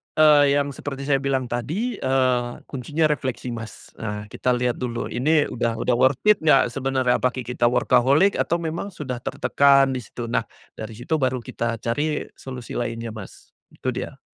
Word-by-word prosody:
eee, 145 -2 +6
yang 145 0 0
seperti 140 0 -6
saya 140 -1 +2
bilang 135 -1 0
tadi, 180 - -2
eee, 130 -2 +2 0.3
kuncinya 145 +4 -1
refleksi, 130 -3 -2
Mas. 115 -1 -8
Nah, 105 -1 -4
kita 125 -1 0
lihat 125 0 -1
dulu 120 -2 -3
ini 150 +5 +3
udah 115 -1 -1
udah 125 +2 +1
worth 130 +2 +3
it 210 -1 +5
nggak 135 -6 +4
sebenarnya, 130 -1 +1
apakah 125 0 -1
kita 120 0 -1
workaholic, 130 +10 +3
atau - - +1
memang 165 +4 -3
sudah 130 -7 -5
tertekan 140 +2 +3
di 130 - -2
situ, 120 +1 -7
nah, 115 -1 0 0.3
dari 110 +1 -6
situ 120 +8 -4
baru 130 -2 0
kita 115 0 -3
cari 145 +6 -1
solusi 125 -3 -8
lainnya, 115 -1 -3
Mas, 110 -3 -11 0.2
itu - - -3
dia. - - -6
130 Hz, 170 wpm, -23 LUFS, 120-145 Hz, 0.3 s, eee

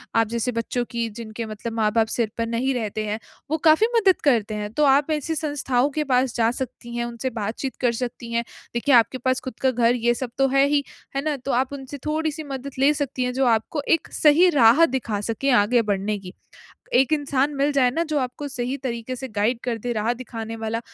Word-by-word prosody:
आप 225 -1 +4
जैसे 235 +2 -1
बच्चों 230 +2 -2
की 235 -1 -1
जिनके 220 +1 -7
मतलब 220 +2 -6
माँ-बाप 220 0 +2
सिर 225 -2 -1
पर 230 - 0
नहीं 250 +4 0
रहते 215 -2 -2
हैं, 210 +1 -3 0.3
वो 315 - +2
काफ़ी 315 +8 +5
मदद 390 -5 +4
करते 225 -6 +2
हैं। 210 0 -4
तो 300 - +1
आप 280 +3 +4
ऐसी 310 +2 -1
संस्थाओं 285 -4 0
के - - +2
पास 250 0 +2
जा 230 -1 +3
सकती 240 -2 -6
हैं 235 - -1
उनसे 240 +2 -4
बातचीत 225 +5 -3
कर 245 - +3
सकती 240 -1 -6
हैं। 235 0 +1 0.3
देखिए 250 +2 +3
आपके 235 +2 +4
पास 255 +1 0
ख़ुद 255 - -7
का 260 -1 +3
घर 240 0 +2
ये 240 0 +2
सब 245 -1 -5
तो 270 0 +4
है 275 +1 +4
ही, 285 0 +2 0.3
है 275 - -1
ना? 300 -2 0
तो 270 +2 -4
आप 260 +3 0
उनसे 275 +1 -7
थोड़ी-सी 315 0 -1
मदद 270 +1 -5
ले 280 +3 +5
सकती 275 -3 -2
हैं 250 0 -1
जो 265 0 +1
आपको 290 +7 -5 0.2
एक - - -18
सही 320 +4 +5
राह 240 +9 +7
दिखा 235 -7 -2
सके 230 +6 -1
आगे 235 +3 +3
बढ़ने 200 +2 -1
की। 185 -1 -10 0.6
एक 265 +4 +4
इंसान 285 -1 +1
मिल 280 +2 +2
जाए 260 -3 +3
ना 325 +7 -1
जो 300 - +1
आपको 260 +3 -4
सही 255 0 -3
तरीके 250 -1 -4
से 265 +1 -6
गाइड 225 +4 +1
कर 235 -2 -2
दे 245 +1 -2
राह 220 +3 0
दिखाने 225 -2 -7
वाला 225 +1 -3
250 Hz, 225 wpm, -23 LUFS, 230-275 Hz, 0.6 s, राह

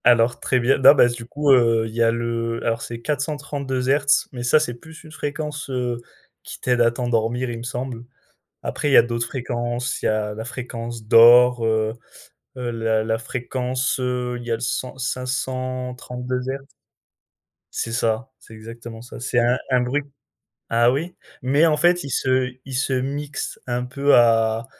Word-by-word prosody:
Alors, 120 0 +4
très 130 - +1
bien, 125 +3 +2
non, 135 +2 +8
bah, 120 - +6
du 120 -1 -6
coup, 145 +4 +1
heu, 115 -3 +4
il 110 - -10
y 115 - -1
a 115 - +5
le 115 0 -2
alors, 115 0 0
c'est 115 0 -6
432 140 -3 -3
hertz, 140 +1 +3
mais 125 - -7
ça 125 +5 +4
c'est 150 -5 -2
plus 160 +7 -14
une 155 - -13
fréquence, 150 -1 -5
heu, 125 -2 -2 0.4
qui - - -9
t'aide 125 -1 +1
à 115 - +5
t'endormir, 120 +1 -1
il 115 - -5
me - - -8
semble. 125 -1 -5 0.6
Après 145 - -2
il - - +1
y - - +7
a - - +9
d'autres 115 0 -2
fréquences. 120 +1 -3
Il - - 0
y - - +3
a 105 -1 0
la 110 +1 -6
fréquence 120 -2 -6
d'or, 120 +2 +7
heu 110 0 +1 0.6
heu, 125 -1 -3
la 115 -1 0
la 110 0 0
fréquence, 125 +3 -2
heu, 125 -1 -2
il 120 - -10
y - - -4
a - - +3
le 115 - -5
cent 125 +2 -3
532 130 -1 -3
hertz 135 +1 -6 1.1
C'est 115 - -3
ça, 115 +2 0
c'est - - -16
exactement 115 +1 -10
ça. 120 - -10
C'est 120 -1 +1
un 120 +2 +3
un 125 -1 +4
bruit 135 +4 -1 0.7
ah 120 +1 +4
oui? 165 +7 -3 0.3
Mais 140 +6 +3
en 155 -2 +3
fait, 175 +2 +3
il 140 - -7
se 130 -1 +1
il 135 - -8
se 135 +1 0
mixe 140 +3 -3
un 125 0 -1
peu 140 +3 +2
à 115 -1 +3
125 Hz, 185 wpm, -22 LUFS, 115-130 Hz, 1.1 s, a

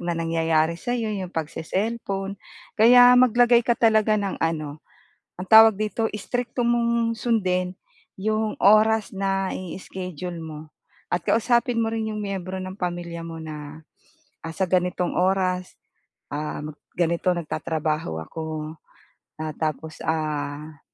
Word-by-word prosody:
na 175 -1 -2
nangyayari 165 -1 +1
sa'yo, 235 -3 -2
'yong 190 -3 -4
pagse-cellphone. 195 +4 -3 0.3
Kaya 245 +3 +8
maglagay 245 -1 +5
ka 235 0 +1
talaga 220 -2 +3
ng 200 -2 -3
ano, 155 -2 -2 0.6
ang 180 - -6
tawag 220 -1 +9
dito, 215 +2 -1
strikto 245 +4 -3
mong 235 -1 +1
sundin 185 -6 0 0.4
'yong 215 +2 0
oras 215 +1 +5
na 195 -1 -1
i-schedule 180 -1 -6
mo 155 -1 -7 0.5
at 175 - +1
kausapin 235 +1 +2
mo 225 - 0
rin 220 -1 -2
'yong - - -4
miyembro 190 -2 -4
ng 185 +1 -7
pamilya 175 -2 -4
mo 165 -1 -7
na, 155 0 -8 0.6
ah, 165 0 -6
sa 190 - 0
ganitong 180 0 0
oras, 185 0 0 0.6
ah, 150 0 -4 0.3
ganito 170 +1 +1
nagtatrabaho 155 - -2
ako. 155 - -6 0.7
Ah, 155 -1 -4
tapos, 155 0 -4
ah, 150 -1 -3
185 Hz, 125 wpm, -24 LUFS, 160-220 Hz, 0.7 s, tawag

